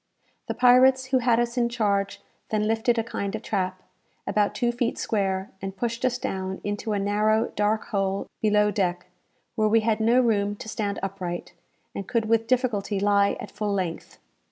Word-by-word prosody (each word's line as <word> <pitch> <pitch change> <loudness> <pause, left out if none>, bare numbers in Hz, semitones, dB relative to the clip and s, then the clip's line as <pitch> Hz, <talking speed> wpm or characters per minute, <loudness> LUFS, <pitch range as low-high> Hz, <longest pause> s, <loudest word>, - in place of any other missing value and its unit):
The - - -3
pirates 255 +1 +5
who 260 0 +2
had 240 -1 +3
us 240 +1 -1
in 235 -1 +2
charge 200 -4 -1 0.3
then 215 -1 0
lifted 225 +2 +1
a 225 - +1
kind 200 -3 -4
of - - -6
trap, 185 -2 -2 0.4
about 210 -1 +1
two 240 -2 +1
feet 240 0 -1
square, 195 -2 -1
and 195 0 -6
pushed 235 +2 -3
us 250 -1 +1
down 190 -4 -4
into 205 +1 -2
a - - 0
narrow 210 +2 +1
dark 210 +1 0
hole 195 -1 -1 0.2
below 210 -1 +3
deck, 180 -3 -1 0.5
where 215 -2 +1
we 225 +1 +4
had 215 0 +1
no 230 +3 +4
room 205 -4 +1
to 210 - -10
stand 205 -2 -2
upright, 185 -3 -4 0.4
and 200 - -6
could 230 -2 0
with 225 0 +1
difficulty 225 -6 0
lie 200 0 +3
at - - -8
full 210 -1 -2
length. 185 -4 -4
210 Hz, 180 wpm, -25 LUFS, 200-230 Hz, 0.5 s, pirates